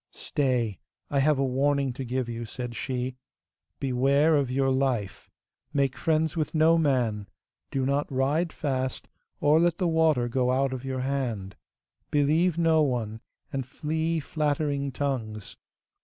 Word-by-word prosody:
'Stay, 125 - -1 0.3
I 140 - +2
have 150 +1 +3
a 135 - +1
warning 135 0 +1
to 135 - -5
give 125 0 -2
you,' 120 0 -4
said 120 +1 -6
she. 125 +2 -3 0.6
'Beware 140 +4 +3
of 140 -3 +1
your 135 +1 +1
life; 130 -7 -1 0.4
make 140 -2 +1
friends 160 0 +1
with 160 0 -2
no 160 +1 +5
man; 120 - 0 0.4
do 135 -1 -1
not 140 +2 0
ride 145 +6 +1
fast, 130 -3 -2 0.3
or 150 +2 +4
let 170 0 +2
the 180 - +1
water 160 -7 +3
go 125 +1 +1
out 135 +1 +1
of 130 -1 -5
your 130 -1 -3
hand; 125 -8 -2 0.5
believe 155 +4 +2
no 165 -2 +4
one, 115 -6 -1 0.3
and 135 -2 -2
flee 160 +4 -1
flattering 145 -2 -1
tongues. 115 -7 -3
135 Hz, 145 wpm, -27 LUFS, 125-150 Hz, 0.6 s, no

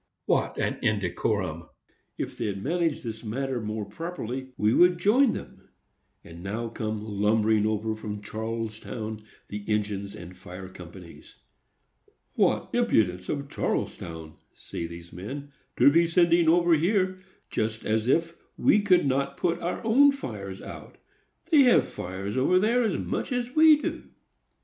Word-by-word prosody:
What - - +1
an - - -1
indecorum! 95 -4 -1 0.5
If - - -4
they'd 100 -2 -3
manage 165 0 0
this 110 -2 -6
matter 130 +3 -2 0.3
properly, 130 -4 -5
we 105 +2 +2
would 180 +3 +5
join 225 +8 +4
them." - - -9 0.5
And 85 +1 -11
now 110 +5 -3
come 110 -2 -4
lumbering 105 +1 +2
over 110 +1 -1
from 105 -1 -6
Charlestown 110 0 -5 0.3
the 105 0 -5
engines 100 -2 -2
and 90 +1 -10
fire 90 +1 -9
companies. 90 -1 -12 1.0
"What - - +1
impudence 105 - +1
of 140 -1 -2
Charlestown," 80 - -4 0.2
say 85 - -6
these 85 0 -11
men, 140 +11 -7 0.3
"to 140 - +7
be 170 +3 +4
sending 170 -1 +4
over 170 +1 +4
here,—just 185 - -1
as 110 +1 0
if 165 +5 +2 0.2
we 210 - +4
could 185 -5 +4
not 140 +1 0
put 170 -1 0
our 175 - -3
own 275 +6 +6
fires 100 - -7
out! - - -10 0.5
They 305 -3 +7
have 245 - +5
fires 95 +3 -5
over 160 +8 +3
there, 225 +6 +3
as 220 -5 0
much - - -3
as 245 0 -2
we 310 -1 +7
do." - - -4
115 Hz, 140 wpm, -27 LUFS, 100-170 Hz, 1.0 s, to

